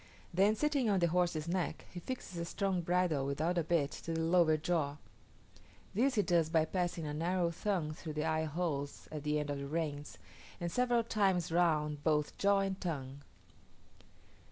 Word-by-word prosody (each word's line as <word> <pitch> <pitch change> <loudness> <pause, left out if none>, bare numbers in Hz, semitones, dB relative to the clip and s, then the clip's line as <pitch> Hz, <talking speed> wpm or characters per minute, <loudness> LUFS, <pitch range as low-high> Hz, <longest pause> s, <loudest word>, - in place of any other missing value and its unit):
Then 200 +4 +4
sitting 280 -2 +1
on 200 - +3
the 170 -2 +3
horse's 170 -2 +1
neck, 180 +1 -2
he 180 - -6
fixes 185 -4 -6
a 170 - -2
strong 190 0 -1
bridle, 175 -4 +1
without 155 +6 0
a - - +1
bit, 155 -3 +1
to 165 - -5
the - - -1
lower 165 -1 +4
jaw: 155 -3 -1 1.0
this 255 +6 +2
he 210 - +3
does 170 -4 +2
by 160 -1 +3
passing 175 -2 -2
a 150 - -3
narrow 170 +2 0
thong 175 -4 -1
through 155 0 -7
the 155 +1 -1
eye 160 0 +1
holes 150 -3 -3
at 155 -1 -4
the 150 +1 0
end 145 -1 -2
of 140 - -3
the 140 - -5
reins, 150 -1 -3 0.4
and 170 -1 -3
several 245 0 +2
times 195 -7 +1
round 150 -4 +1
both 150 -2 +1
jaw 200 0 +4
and 195 0 -2
tongue. 140 -6 -4
170 Hz, 180 wpm, -34 LUFS, 150-185 Hz, 1.0 s, Then